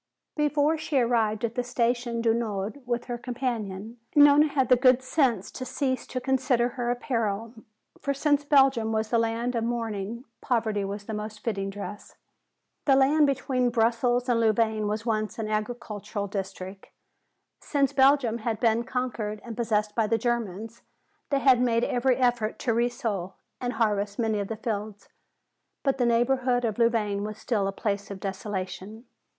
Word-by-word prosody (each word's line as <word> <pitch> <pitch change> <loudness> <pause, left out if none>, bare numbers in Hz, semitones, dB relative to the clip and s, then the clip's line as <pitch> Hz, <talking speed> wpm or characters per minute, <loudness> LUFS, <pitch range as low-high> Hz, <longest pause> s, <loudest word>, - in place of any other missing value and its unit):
Before 300 +1 +2
she 310 -2 -1
arrived 230 -3 +2
at 230 - -3
the 245 - -1
Station 240 -1 0
du 230 -1 +3
Nord 220 +2 -3
with 240 0 -1
her 240 -1 -4
companion, 235 -4 -4 0.2
Nona 290 +1 +7
had 270 -3 +1
the 250 - +7
good 255 +1 +4
sense 255 - +1
to - - -6
cease 260 -1 -2
to 255 - -3
consider 250 -2 +1
her 245 -1 -3
apparel. 230 -3 -2 0.5
For 280 - -1
since 290 +1 +1
Belgium 270 -6 +4
was 220 +1 -1
a 230 - +5
land 230 +2 -1
of 230 -2 -1
mourning, 230 0 -3 0.2
poverty 220 -5 0
was 200 +1 -5
the 220 - -6
most 210 0 -6
fitting 195 -4 -2
dress. 205 +1 -8 0.7
The 275 - +5
land 285 +3 +4
between 260 -2 0
Brussels 240 +1 +1
and 240 -2 +2
Louvain 220 -1 +2
was 215 +2 -2
once 215 0 -1
an 220 -2 -3
agricultural 215 -1 -3
district. 195 -1 -6 0.7
Since 280 -3 0
Belgium 265 -4 +4
had 220 -1 -2
been 230 0 +2
conquered 235 -5 -3
and 230 -2 -6
possessed 210 -2 0
by 220 0 +1
the 225 +1 +2
Germans, 225 -2 -3 0.5
they 275 -1 +1
had 255 -3 +5
made 235 -1 +2
every 250 +1 +2
effort 245 -4 +1
to 235 - +1
resow 230 -6 -1 0.3
and 245 0 -2
harvest 205 -3 0
many 220 -3 0
of 200 - -2
the 225 - -4
fields. 210 -2 -4 0.7
But 270 -1 +1
the 245 - +3
neighborhood 245 +1 +2
of 220 0 -2
Louvain 215 -4 +1
was 215 0 -5
still 215 -4 -1
a - - -1
place 200 0 -3
of 200 -1 -7
desolation. 195 +3 -5
230 Hz, 165 wpm, -27 LUFS, 215-250 Hz, 0.7 s, Nona